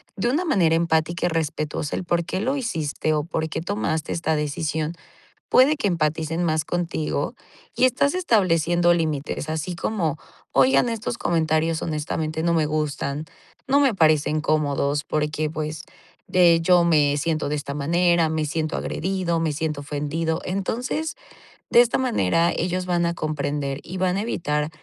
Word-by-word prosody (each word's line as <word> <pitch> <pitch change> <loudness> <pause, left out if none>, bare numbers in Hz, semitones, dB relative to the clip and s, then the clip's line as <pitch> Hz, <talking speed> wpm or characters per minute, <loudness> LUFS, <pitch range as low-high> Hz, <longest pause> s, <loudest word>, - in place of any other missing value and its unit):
de 235 +5 0
una 310 +7 +1
manera 180 - +3
empática 165 +1 +1
y - - 0
respetuosa 155 -2 -2
el - - -3
por 175 -1 0
qué 185 - -3
lo 260 +6 0
hiciste, 155 - -1
o 150 -1 0
por 160 0 -2
qué 160 - -3
tomaste 165 -4 -2
esta 160 -2 0
decisión, 150 +1 -2 0.6
puede 280 +4 +5
que 245 - 0
empaticen 160 -1 0
más 155 -2 +1
contigo, 170 -3 -2 0.4
y - - +4
estás 280 +3 +2
estableciendo 175 - +3
límites. 155 -2 -2
Así 160 +3 -3
como: 170 -5 -1 0.3
"Oigan 135 - +4
estos 230 +1 -3
comentarios, 160 -2 +1
honestamente, 155 0 -2
no 170 0 +2
me 160 -2 +2
gustan. 150 -1 -2 0.4
No 275 +2 +4
me 270 -6 +3
parecen 155 -2 +3
cómodos, 145 -1 0
porque, 155 0 -1
pues, 155 0 -5 0.4
de 175 -2 +5
hecho, 170 +1 +4
me 150 -4 +3
siento 155 -1 -1
de 150 - 0
esta 145 -1 -4
manera, 170 +3 +2
me 155 -1 -1
siento 155 +1 -2
agredido, 180 -1 -1
me 165 -1 0
siento 150 -1 -3
ofendido". 150 +3 -2
Entonces, 250 +11 -2 0.5
de - - +6
esta 245 0 +2
manera, 170 - +2
ellos 180 +1 -1
van 175 -1 +1
a 170 - 0
comprender, 145 -3 -2
y 185 - -8
van 185 0 +1
a - - 0
evitar, 150 -9 -1
160 Hz, 160 wpm, -23 LUFS, 150-180 Hz, 0.6 s, de